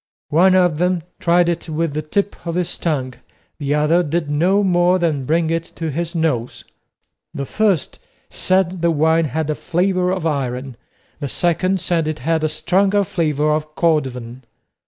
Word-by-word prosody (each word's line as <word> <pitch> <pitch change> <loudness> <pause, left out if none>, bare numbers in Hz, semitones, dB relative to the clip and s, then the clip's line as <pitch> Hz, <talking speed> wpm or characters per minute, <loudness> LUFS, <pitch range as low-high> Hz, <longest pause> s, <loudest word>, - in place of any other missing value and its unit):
One 185 +5 +4
of 180 -4 +3
them 180 -1 +1 0.2
tried 175 0 +3
it 170 -1 -2
with 160 -1 -1
the 155 - -2
tip 200 +7 -1
of 170 - -2
his 175 -1 -1
tongue, 135 -6 -1 0.5
the 145 0 0
other 150 +4 +3
did 155 -2 -2
no 185 +7 +2
more 180 -1 +3
than 155 -7 -1
bring 160 +3 +1
it 165 0 0
to 165 -2 -3
his 170 +4 -3
nose. 140 -8 -1 0.7
The 140 - -3
first 200 -2 0 0.3
said 185 -1 0
the 170 - +3
wine 160 +1 +2
had 155 +2 -2
a - - +1
flavour 180 +3 0
of 185 -3 -2
iron, 130 -4 -2 0.4
the 145 - -3
second 185 +5 0
said 170 -3 0
it 155 - -2
had 160 +5 -1
a 155 - +1
stronger 195 +6 +1
flavour 155 -5 0
of 155 0 -3
cordovan. 130 -7 -1
165 Hz, 170 wpm, -19 LUFS, 150-180 Hz, 0.7 s, One